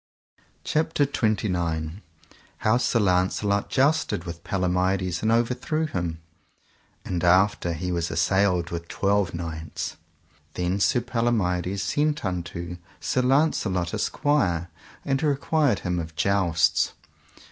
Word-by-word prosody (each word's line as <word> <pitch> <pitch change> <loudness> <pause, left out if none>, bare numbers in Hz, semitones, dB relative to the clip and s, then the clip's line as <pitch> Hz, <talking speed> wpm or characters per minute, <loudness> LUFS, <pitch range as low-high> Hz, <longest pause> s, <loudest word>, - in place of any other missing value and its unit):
CHAPTER 155 -1 +1
XXVIII. 90 - -1 0.6
How 110 +3 +2
Sir 120 -1 +1
Launcelot 100 +1 +1
jousted 140 - +1
with 85 -1 -8
Palomides 90 -1 0
and 110 - +1
overthrew 125 +7 +1
him, 85 - -3 0.8
and 90 -1 -2
after 90 -1 +3
he 90 +3 -3
was 85 -1 -1
assailed 95 -3 +1
with 85 0 -5
twelve 100 -2 0
knights. 80 -2 -5 0.6
Then 90 +2 -1
Sir 120 +4 +3
Palomides 100 -6 0
sent 150 +6 0
unto 85 -1 -4 0.2
Sir 130 - 0
Launcelot 125 - +1
a - - -2
squire, 90 - 0 0.3
and 135 -1 0
required 145 -1 +1
him 90 -1 -1
of 80 -1 -6
jousts. 95 -4 +2
95 Hz, 115 wpm, -25 LUFS, 85-120 Hz, 0.8 s, after